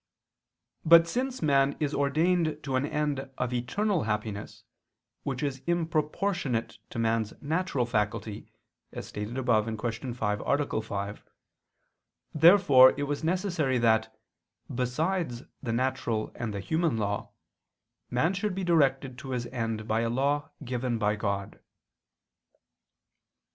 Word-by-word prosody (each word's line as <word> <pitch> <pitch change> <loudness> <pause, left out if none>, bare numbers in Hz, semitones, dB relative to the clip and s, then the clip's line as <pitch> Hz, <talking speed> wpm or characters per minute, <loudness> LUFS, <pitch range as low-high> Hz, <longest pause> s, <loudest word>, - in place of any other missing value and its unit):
But 165 +1 +7
since 255 +3 -2
man 140 -2 +3
is 150 -1 -1
ordained 155 +2 +1
to 135 -2 -2
an 130 +3 +1
end 145 -3 -2
of 125 -1 -2
eternal 170 - 0
happiness 105 -1 -4 0.6
which 135 0 -3
is 140 -2 -2
improportionate 160 - -1
to - - -8
man's 115 -2 0
natural 155 -3 -1
faculty, 105 -2 -2 0.4
as - - -6
stated 105 +4 -5
above 115 -4 +2
(Q. 115 +3 -3
5, 105 -3 -1
A. 140 -5 0
5), 100 -1 -5 1.1
therefore 155 -6 +7
it 145 - -1
was 145 +2 -3
necessary 170 -6 0
that, 110 -1 +2 0.6
besides 130 +2 -1 0.2
the 120 - -3
natural 120 -3 -1
and 120 -2 -4
the 100 -1 -4
human 160 - 0
law, 100 -1 -2 0.8
man 155 +9 +1
should 195 0 -2
be 190 - -3
directed 135 -6 +2
to 140 -2 -8
his 120 -1 -2
end 115 -3 -3
by 110 0 +1
a 115 - 0
law 140 +4 0 0.2
given 125 -1 -1
by 105 -1 +1
God. 100 -2 -3
130 Hz, 125 wpm, -28 LUFS, 115-155 Hz, 1.1 s, But